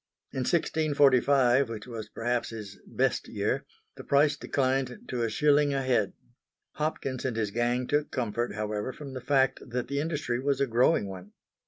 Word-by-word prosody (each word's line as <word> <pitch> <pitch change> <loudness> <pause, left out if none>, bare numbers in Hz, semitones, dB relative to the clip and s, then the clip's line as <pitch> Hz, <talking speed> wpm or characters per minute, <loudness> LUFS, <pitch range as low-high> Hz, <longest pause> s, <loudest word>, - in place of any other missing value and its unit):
In - - -4
1645, 140 -4 +3
which 110 -2 -6
was 115 -3 -7
perhaps 120 +1 -1
his 105 -3 -8
"best" - - 0
year, - - -2 0.3
the - - -8
price 145 +1 +3
declined 135 0 0
to 120 - -2
a 115 - +1
shilling 145 +3 +3
a 135 - 0
head. 120 -6 +1 0.6
Hopkins 140 -4 -3
and 125 -4 -2
his 110 -3 -1
gang 120 +3 0
took 145 +3 0
comfort, 120 -3 -2
however, 105 +3 -3
from 140 -3 -9
the 130 - -5
fact 135 +1 +2
that 125 0 -3
the 140 0 -1
industry 145 -6 -1
was 140 +1 0
a 140 - +3
growing 120 -1 +3
one. 95 +1 -9
130 Hz, 170 wpm, -28 LUFS, 115-140 Hz, 0.6 s, 1645